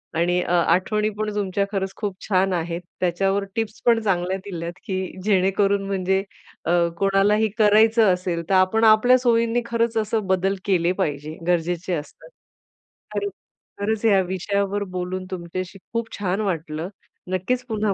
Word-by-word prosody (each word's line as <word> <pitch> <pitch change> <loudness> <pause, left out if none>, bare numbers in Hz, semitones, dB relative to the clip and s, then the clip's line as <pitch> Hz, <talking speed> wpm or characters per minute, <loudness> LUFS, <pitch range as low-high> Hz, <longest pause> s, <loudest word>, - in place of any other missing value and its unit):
आणि 175 +2 +2
अ, - - -3
आठवणी 210 +5 +2
पण 215 0 -1
तुमच्या 200 -1 0
खरंच 195 -1 -2
खूप 205 -3 -3
छान 190 -1 +2
आहेत. 170 0 -2 0.2
त्याच्यावर 195 +3 +1
टिप्स 225 -2 -3
पण 230 -1 +5
चांगल्या 185 -1 0
दिल्यात, 170 -3 -5
की 190 -4 -3 0.3
जेणेकरून 195 0 +2
म्हणजे 190 0 0 0.4
अ, 170 - +1 0.3
कोणालाही 200 +3 +3
करायचं 215 -1 +5
असेल 180 -2 -2
तर - - +2
आपण 185 +4 +3
आपल्या 225 +3 +6
सोयींनी 235 -1 +2
खरंच 230 0 0
असं 215 -2 0
बदल 190 +1 +1
केले 180 -3 +2
पाहिजे, 150 0 -3
गरजेचे 175 +1 0
असतात. 155 - -6 0.9
खरंच 405 -1 -1 0.5
खरंच 220 +2 -1
या 200 -4 +5
विषयावर 200 +2 -1
बोलून 185 +1 -3
तुमच्याशी 185 +2 -5 0.2
खूप 230 0 -2
छान 195 +1 -1
वाटलं. 165 -3 -3 0.4
नक्कीच 215 +8 -1
पुन्हा 215 -2 0
195 Hz, 145 wpm, -23 LUFS, 180-215 Hz, 0.9 s, आपल्या